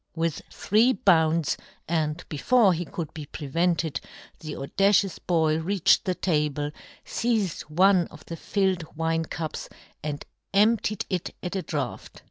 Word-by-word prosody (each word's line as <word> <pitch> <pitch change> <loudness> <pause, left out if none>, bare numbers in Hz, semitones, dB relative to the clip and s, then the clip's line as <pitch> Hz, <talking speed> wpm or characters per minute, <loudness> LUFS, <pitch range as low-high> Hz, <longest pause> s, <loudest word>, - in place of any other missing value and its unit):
"' - - -46
With 165 -1 -1
three 225 +5 +3
bounds, 165 - +3 0.3
and 160 0 -1
before 200 - +3
he 175 +1 -3
could 160 -1 -6
be 150 -2 -7
prevented, 160 0 -1 0.4
the 155 -1 -6
audacious 195 +7 +2
boy 160 -3 +1
reached 185 +2 +3
the 185 -2 0
table, 150 -4 0 0.3
feized 220 -7 -1
one 185 +2 +4
of - - -15
the 165 - -6
filled 185 -4 -1
wine 165 0 0
cups, 160 0 -5 0.3
and 145 -1 -4 0.3
emptied 215 0 +3
it 185 -3 -3
at 180 +2 -3
a 190 - 0
draught. 145 -8 -5
165 Hz, 140 wpm, -26 LUFS, 155-195 Hz, 0.4 s, one